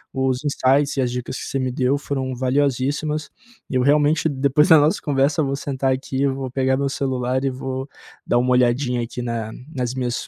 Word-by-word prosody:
os 130 0 0
insights 140 0 +2
e 135 - +1
as 125 - 0
dicas 125 +1 -4
que - - -6
você - - -3
me 130 -1 -1
deu 130 +2 +1
foram 135 -2 -3
valiosíssimas. 140 +3 0 0.4
Eu 130 - 0
realmente, 150 +3 +3
depois 140 +2 +2
da 160 - +9
nossa 150 +2 +2
conversa, 140 0 +1
vou 140 -2 0
sentar 135 -1 -1
aqui, 130 0 -2
eu 140 -1 +1
vou 135 -2 -5
pegar 130 0 +1
meu 140 0 0
celular 130 -2 -1
e 135 - +1
vou 130 +1 -5 0.4
dar 120 - +2
uma 125 +1 +2
olhadinha 125 0 +2
aqui 115 +1 -5
na 115 -2 -3 0.2
nas 125 -2 -2
minhas 125 -2 -2
130 Hz, 200 wpm, -21 LUFS, 125-140 Hz, 0.4 s, da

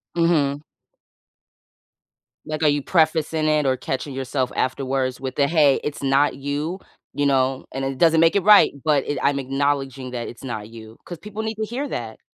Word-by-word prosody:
Mhm. 150 -5 +1 1.8
Like, 155 0 -4
are - - +5
you 145 0 +1
prefacing 160 -1 +1
it 150 -1 +2
or 130 -1 +2
catching 135 +1 -4
yourself 130 -1 -2
afterwards 130 0 -1
with 130 -1 -5
the, 140 -1 +2
"Hey, 150 -4 +4
it's 150 - -4
not 140 +1 +2
you," 145 +6 -3 0.3
you 145 - 0
know? 135 -1 +1
And, 135 +1 -3
"it 135 -1 -3
doesn't 165 -1 +4
make 165 +3 +4
it 200 - +2
right, 210 +1 +7
but, 150 -3 +2
it 145 - -2
I'm 140 +1 +1
acknowledging 135 -1 -2
that 120 -2 -4
it's 120 - -11
not 110 -4 -6
you," 110 -1 -12
'cause 175 - -7
people 210 +1 -6
need 220 0 -3
to 220 - -3
hear 255 +6 -4
that. 110 - -6
140 Hz, 185 wpm, -22 LUFS, 130-160 Hz, 1.8 s, right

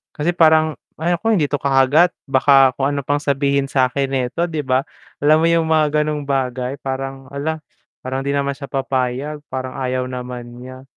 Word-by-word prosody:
Kasi 165 +3 -1
parang, 155 -2 +4 0.2
"Ay 175 +2 +1
nako 225 +6 -1
hindi 170 -9 +2
'to 145 - -1
kakagat, 140 +5 +3 0.2
baka 135 -1 +5
kung 135 +1 0
ano 145 - -2
pang 145 +2 -1
sabihin 140 -1 0
sa'kin 135 +1 +1
neto," 130 +5 -1
'di 165 -3 -2
ba? 130 -1 +1 0.4
Alam 155 +1 +6
mo 165 - +3
yung 165 -1 +2
mga 155 -1 +4 0.2
ganong 150 -2 -3
bagay, 130 -1 -1
parang, 135 0 -5
"Hala 155 +3 -3 0.4
parang 130 +1 -3
'di 140 - -1
naman 140 0 0
siya 140 0 -8
papayag 135 +2 -2
parang 130 0 -5
ayaw 130 -1 -1
naman 125 -1 -6 0.2
niya." 130 0 -10
140 Hz, 180 wpm, -19 LUFS, 130-150 Hz, 0.4 s, Alam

